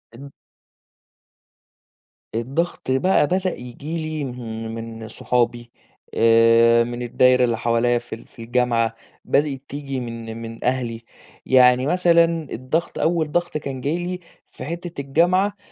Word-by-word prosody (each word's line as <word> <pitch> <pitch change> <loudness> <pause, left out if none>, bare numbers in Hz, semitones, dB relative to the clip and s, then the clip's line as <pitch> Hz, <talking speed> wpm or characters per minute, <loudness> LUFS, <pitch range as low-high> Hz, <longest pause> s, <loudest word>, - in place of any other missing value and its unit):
إن 140 +3 -10 2.1
الضغط 130 +5 -2
بقى 150 +4 +3
بدأ 185 +2 0
ييجي 135 +7 -7
لي 155 -2 -3
من 115 -3 -6 0.2
من 110 - -8
صحابي 120 +1 -1 0.4
آآ، 115 +1 +5
من 120 +1 -5
الدايرة 125 +1 +3
اللي 120 -2 +1
حواليّا 120 +1 +1
في 120 -1 -8
ال - - -16
في - - -14
الجامعة، 115 -1 +1 0.3
بدأت 140 -2 +1
تيجي 140 -1 -4
من 115 -2 -6
من 115 0 -8
أهلي، 120 -2 -2 0.4
يعني 125 0 +5
مثلًا 170 -1 +4 0.3
الضغط 145 +8 -2
أول 160 -2 +1
ضغط 175 -2 -1
كان 135 -3 -6
جاي 150 +6 -1
لي 180 +1 -4 0.3
في - - -9
حِتّة 170 -1 -5
الجامعة 180 +8 +2
125 Hz, 130 wpm, -22 LUFS, 115-155 Hz, 2.1 s, آآ